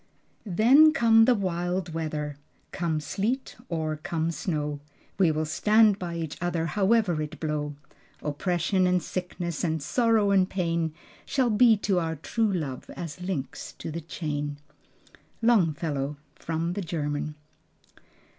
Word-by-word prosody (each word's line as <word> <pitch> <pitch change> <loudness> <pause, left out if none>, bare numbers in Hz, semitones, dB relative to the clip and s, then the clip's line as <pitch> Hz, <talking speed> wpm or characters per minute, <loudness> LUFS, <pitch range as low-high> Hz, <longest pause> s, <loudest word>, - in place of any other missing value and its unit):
"Then 260 - +6
come 225 -5 +6
the 250 0 +5
wild 175 -3 -2
weather 150 -2 -3 0.4
come 165 -4 -1
sleet 215 - -2
or 155 -2 -2
come 160 +1 -2
snow, 150 -4 -2 0.4
We 185 -4 +5
will 155 0 0
stand 210 +5 +4
by 175 -2 -4
each 160 -2 -5
other, 175 -2 0
however 195 -1 +2
it 155 +1 -6
blow; 150 -2 -2 0.5
Oppression 175 +5 +1
and 180 -2 +2
sickness, 175 -2 -4
and 160 -2 0
sorrow 225 - +2
and 190 -1 +4
pain, 170 -3 -1 0.3
Shall 255 -4 +1
be 225 +1 +6
to 190 -3 +2
our 165 -1 -2
true 215 +8 0
love 150 -9 -4
as 170 0 -7
links 170 -8 -4
to - - -7
the 170 +2 -4
chain." 145 -1 -4 0.8
Longfellow. 160 - +1 0.2
(From 165 +1 -3
the 205 - -3
German.) 150 -3 -3
170 Hz, 135 wpm, -27 LUFS, 155-195 Hz, 0.8 s, Then